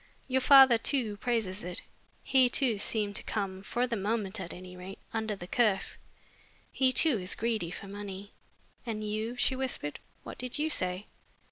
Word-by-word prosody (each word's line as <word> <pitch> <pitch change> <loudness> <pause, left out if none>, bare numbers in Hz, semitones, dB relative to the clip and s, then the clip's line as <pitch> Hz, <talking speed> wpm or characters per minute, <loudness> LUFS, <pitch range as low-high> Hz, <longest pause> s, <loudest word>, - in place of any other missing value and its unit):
Your 260 0 +1
father, 265 -4 +8
too, 225 -6 +1
praises 220 -5 -2
it. 180 0 -4 0.4
He, 260 -2 +4
too, 245 -5 +2
seemed 205 -1 +1
to - - -2
come 195 -3 -3
for 240 +5 -1
the 240 -2 -2
moment, 210 0 -1
at 175 -2 -6
any 180 0 -10
rate 185 +2 -9 0.2
under 220 -2 -2
the 175 - -9
curse. 205 -1 +1 0.7
He, 260 -1 +2
too, 265 -4 +4
is 180 +1 -3
greedy 220 -6 -1
for 195 - -8
money." 200 0 -8 0.5
"And 220 -3 -4
you?" 215 +3 -3
she 260 +2 +2
whispered. 255 - -3 0.2
"What - - -9
did 250 +2 -4
you 310 +2 -1
say? 185 -3 0
215 Hz, 170 wpm, -30 LUFS, 195-245 Hz, 0.7 s, father